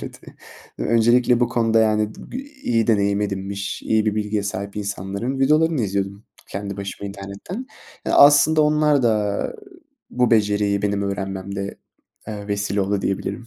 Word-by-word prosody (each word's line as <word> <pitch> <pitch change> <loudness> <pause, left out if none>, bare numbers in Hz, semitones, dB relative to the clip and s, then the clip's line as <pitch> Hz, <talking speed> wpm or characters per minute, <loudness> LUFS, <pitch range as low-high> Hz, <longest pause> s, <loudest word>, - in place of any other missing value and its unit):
Evet, - - -9
eee, - - -13 0.5
öncelikle 120 +1 +3
bu 120 - +3
konuda, 115 -1 +2
yani, 110 -1 +2
b - - -9
iyi 265 - -2
deneyim 100 -2 +2
edinmiş, 100 0 -3
iyi 110 0 +1
bir 105 - +1
bilgiye 105 -1 -1
sahip 100 0 -5
insanların 100 +5 -3
videolarını 155 +2 +3
izliyordum 100 +1 -3 0.2
kendi 100 0 -5
başıma 100 0 -6
internetten. 100 - -7 0.4
Ya, - - 0
aslında 145 +2 +7
onlar 150 -2 +3
da 105 -3 0 0.6
bu 125 -1 +1
beceriyi 105 -2 +2
benim 100 -1 0
öğrenmemde, 100 0 -4 0.5
eee, 105 -1 -6
vesile 100 0 -1
oldu 100 0 -1
diyebilirim. 100 +4 -3
105 Hz, 145 wpm, -22 LUFS, 100-120 Hz, 0.6 s, aslında